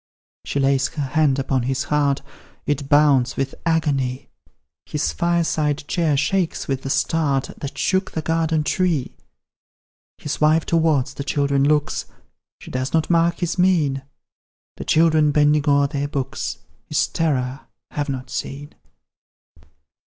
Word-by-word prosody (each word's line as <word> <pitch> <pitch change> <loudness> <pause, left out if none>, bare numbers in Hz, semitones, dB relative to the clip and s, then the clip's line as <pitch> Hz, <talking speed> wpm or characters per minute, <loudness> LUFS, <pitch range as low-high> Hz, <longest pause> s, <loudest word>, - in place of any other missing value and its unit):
She 140 - -2
lays 135 0 +2
her 150 - -4
hand 150 -3 +3
upon 135 -1 0
his 130 +2 -1
heart, 145 -2 +1 0.4
It 145 -1 -2
bounds 140 -4 +4
with 135 0 -1
agony; 140 -6 0 0.6
His 75 - -1
fireside 155 - 0
chair 160 -5 +1
shakes 180 +4 0
with 135 -1 -2
the 135 - -5
start 140 -2 0
That 140 - -6
shook 190 0 +1
the 160 - -3
garden 160 -1 +1
tree. 165 -3 0 1.0
His 150 - -5
wife 155 +1 +4
towards 155 -5 +1
the 140 - -5
children 140 -1 +1
looks, 150 0 +1 0.5
She - - -11
does 130 +1 -3
not 160 +1 +1
mark 170 0 +2
his 175 +1 -1
mien; 160 -7 +2 0.8
The - - -6
children, 155 -2 +4
bending 150 0 +3
o'er 140 0 +4
their 140 0 -2
books, 135 -2 -3 0.3
His - - +2
terror 135 -5 -2 0.2
have 145 -1 -3
not 130 -2 -5
seen. 145 +2 -5
145 Hz, 135 wpm, -21 LUFS, 135-160 Hz, 1.0 s, bounds